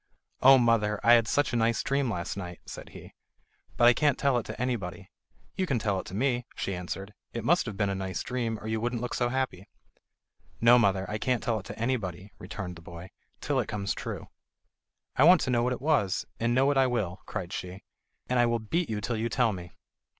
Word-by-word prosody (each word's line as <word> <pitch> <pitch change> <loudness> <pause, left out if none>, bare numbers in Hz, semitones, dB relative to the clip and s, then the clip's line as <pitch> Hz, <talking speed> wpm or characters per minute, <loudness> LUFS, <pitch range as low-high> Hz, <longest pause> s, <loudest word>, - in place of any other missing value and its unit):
"Oh, 135 +1 +9
mother, 115 -4 +2
I 120 +2 +7
had 115 -2 +5
such 145 -3 +1
a - - +1
nice 115 0 +1
dream 140 -2 0
last 85 -5 -3
night," 90 -3 -7
said - - -9
he; - - -12 0.6
"but 120 - +5
I 120 - +8
can't 145 +2 +2
tell 140 -2 +2
it 115 - -8
to - - -7
anybody." 95 -7 -3 0.4
"You 185 - -1
can 135 - +1
tell 105 -4 0
it - - -8
to 95 - -7
me," 125 +1 0
she 100 - -3
answered. 95 +3 -6 0.2
"It 115 -1 -4
must 175 -2 +3
have 105 -3 -5
been 100 -2 +1
a - - -1
nice 95 -2 -3
dream, 120 -3 -2
or - - -11
you 110 0 -1
wouldn't 120 0 -2
look 125 - -3
so 120 -1 +1
happy." 125 -8 -2 0.9
"No, 120 +1 +7
mother; 95 -4 +2
I 105 +2 -3
can't 125 -1 0
tell 115 -2 0
it 95 - -11
to - - -8
anybody," 105 -6 -2
returned 90 -4 -6
the - - -13
boy, 85 +2 -10 0.3
"till - - 0
it - - -1
comes 100 -2 -2
true." - - -6 0.9
"I 130 - +5
want 175 +2 +8
to 130 - -1
know 120 -1 +3
what 125 +1 +1
it 125 - -3
was, 140 -12 +1
and 120 +1 +1
know 135 +2 +4
it 140 - 0
I 135 -1 +5
will," 105 -7 -2
cried 95 -5 -5
she, 90 +1 -6 0.4
"and 125 -1 +1
I 120 - +5
will 120 0 +1
beat 150 +10 -2
you 105 -2 -2
till 115 +2 -2
you 115 +2 -1
tell 115 -1 +2
me." 90 -2 -8
115 Hz, 230 wpm, -28 LUFS, 95-125 Hz, 0.9 s, Oh